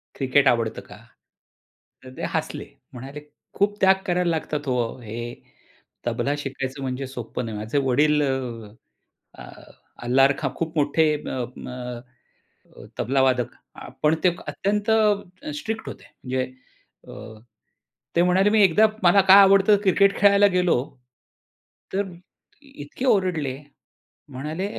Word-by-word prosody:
Cricket 135 +1 +2
आवडतं 115 -3 +1
का? - - -14 1.1
तर 130 - -11
ते - - -6
हसले - - -3 0.3
म्हणाले 135 +4 -9 0.4
"खूप 205 +1 +1
त्याग 190 0 +6
करायला 180 0 +1
लागतात 150 -2 -3
हो, 125 -1 0 0.2
हे 110 -1 -8 0.9
तबला 140 - -1
शिकायचं 135 -1 -5
म्हणजे 130 0 -4
सोप्पं 125 -1 -6
नाही. 110 -2 -5
माझे 110 +6 -3
वडील 150 +3 +3
अ, 125 -5 -3 0.7
अ, - - -12 0.6
अल्लारखा 135 +3 +3
खूप 165 0 -4
मोठे 150 +2 +2
अ, 130 -4 -4
म - - -9
म 125 0 -10 0.7
तबलावादक 130 -2 +1 0.5
पण 150 +1 +4
ते 180 - +6 0.2
अत्यंत 205 +2 -2 0.7
स्ट्रिक्ट 225 0 -5
होते. - - -11 0.2
म्हणजे 130 0 -1 0.6
अ, 110 0 -11 0.8
ते 170 - +4
म्हणाले 190 +3 +3
मी 215 0 +3
एकदा 200 +4 +5 0.2
मला 185 +3 +6
काय 200 - +10
आवडतं 195 +2 +5
क्रिकेट 200 +1 +3
खेळायला 200 0 +6
गेलो. 180 -1 +3 1.2
तर 200 - +1 0.6
इतके 260 - -8
ओरडले 180 - +1 0.7
म्हणाले, 150 +7 -5
145 Hz, 120 wpm, -23 LUFS, 130-190 Hz, 1.2 s, काय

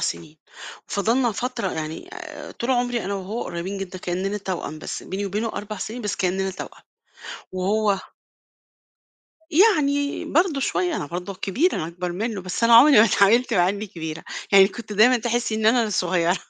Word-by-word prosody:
سنين، 160 -1 -4 0.5
فضَلنا 230 +4 +1
فترة 240 +2 -3
يعني 155 0 -5
آآ - - -9
طول 235 - -4
عمري 245 -2 0
أنا 200 +1 -2
وهو 200 +5 -4
قريّبين 180 +3 -5
جدًا 185 -1 -6
كإننا 190 +4 -2
توأم، 180 -6 -5
بس - - -6
بيني 200 +2 -4
وبينه 210 +4 -2
4 210 0 -6
سنين 230 +4 -6
بس 200 -2 -2
كإننا 190 +1 0
توأم. 190 - -9 0.7
وهو 200 +2 +1 1.5
يعني 295 -6 +3
برضه 320 -3 +1
شوية 355 +3 0
أنا 145 - -4
برضه 180 +4 -5
الكبيرة 245 - 0
أنا 155 - -2
أكبر 175 +1 -5
منه، 210 +1 -3
بس 185 +5 -2
أنا 230 0 +6
عمري 270 +2 +8
ما 225 - +8
اتعاملت 225 +4 +3
معاه 175 -1 +4
إني 205 +2 -3
كبيرة، 160 -4 -7 0.3
يعني 195 0 +8
كنت 225 -2 -9
دايمًا 240 +5 +5
تحسّي 235 -1 -1
إن 220 0 0
أنا 235 +1 +4
الصغيّرة، 180 -3 +1
205 Hz, 165 wpm, -23 LUFS, 185-240 Hz, 1.5 s, عمري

